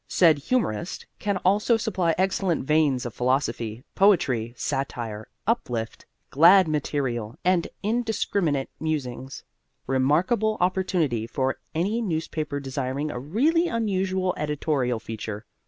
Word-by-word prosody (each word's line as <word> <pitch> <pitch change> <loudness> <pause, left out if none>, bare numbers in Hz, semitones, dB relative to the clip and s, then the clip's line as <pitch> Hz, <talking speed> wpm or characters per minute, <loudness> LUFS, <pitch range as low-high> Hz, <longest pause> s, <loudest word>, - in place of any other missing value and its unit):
Said 160 -5 +4
Humorist 170 - -1
can 205 -2 0
also 210 +5 +4
supply 190 -7 0
excellent 185 -4 0
veins 150 -4 +2
of 120 - -5
philosophy, 120 -3 -1
poetry, 135 - +3
satire, 115 -5 -3 0.2
uplift, 125 - -2 0.2
glad 175 +5 +7
material 135 -7 -2
and 180 -2 +3 0.2
indiscriminate 200 - 0
musings. 135 -4 -4 0.4
Remarkable 175 - +2
opportunity 180 - 0
for 130 +1 -1 0.2
any 200 +8 0
newspaper 160 -6 -2
desiring 135 +2 -3
a 120 - -5
really 285 - +2
unusual 190 - 0
editorial 145 -5 -1
feature. 110 -1 -6
155 Hz, 105 wpm, -25 LUFS, 130-190 Hz, 0.4 s, glad